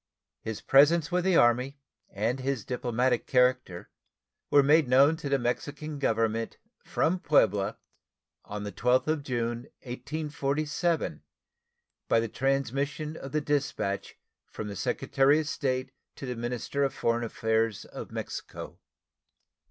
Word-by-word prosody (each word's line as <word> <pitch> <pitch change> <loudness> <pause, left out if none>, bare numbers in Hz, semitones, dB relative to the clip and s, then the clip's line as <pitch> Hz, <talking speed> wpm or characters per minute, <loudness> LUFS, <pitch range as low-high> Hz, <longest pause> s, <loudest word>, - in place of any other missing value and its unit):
His 110 -2 -5
presence 150 +3 +5
with 180 0 +1
the 190 -2 +3
Army 125 +4 +3 0.3
and 115 +6 -1
his 130 -4 -2
diplomatic 125 0 0
character 125 -8 +1 0.6
were 145 -1 +6
made 150 +1 +5
known 135 +5 +5
to 150 -4 -5
the 140 - +3
Mexican 145 +4 -3
Government 115 -3 0 0.3
from 180 +3 0
Puebla 105 - +2 0.7
on 105 0 -6
the 105 - -4
12th 125 +7 +2
of 155 -1 0
June, 120 -3 -3 0.2
1847, 150 +4 -2 0.9
by - - +4
the 115 - -1
transmission 135 +4 -1
of 135 -4 -8
the 150 - 0
dispatch 140 -9 -2 0.3
from 105 - -6
the 100 - -6
Secretary 135 - +2
of 155 - -3
State 130 -3 -2 0.2
to - - -7
the 125 -1 -3
minister 120 +4 -2
of 135 - 0
foreign 115 0 0
affairs 110 -1 0
of - - -8
Mexico. - - -7
130 Hz, 130 wpm, -28 LUFS, 115-145 Hz, 0.9 s, were